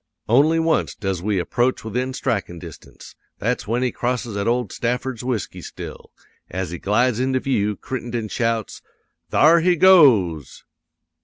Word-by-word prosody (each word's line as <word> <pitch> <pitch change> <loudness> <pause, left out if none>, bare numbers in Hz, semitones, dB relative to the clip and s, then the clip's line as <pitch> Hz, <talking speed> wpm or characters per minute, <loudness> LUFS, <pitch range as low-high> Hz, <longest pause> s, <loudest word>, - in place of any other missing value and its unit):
"'Only 145 +8 +4
once 165 -1 +1
does 95 -4 -3
we 100 +1 -1
approach 120 +8 0
within 125 +4 -2
strikin' 100 -9 -2
distance; 85 -2 -12 0.2
that's 115 0 -2
when 120 +3 0
he 125 - 0
crosses 120 -3 -3
at 100 +1 -2
old 120 -3 0
Stafford's 125 0 -3
whisky 125 -4 -3
still. - - -9 0.4
As 90 -1 -4
he 85 - -6
glides 120 +3 +1
into 130 0 +1
view, 105 -6 0
Crittenden 120 -1 -5
shouts: 115 0 -2 0.5
"'"Thar 165 +3 +5
he 175 +2 +3
goes!" 120 - +4
120 Hz, 145 wpm, -21 LUFS, 100-130 Hz, 0.5 s, Thar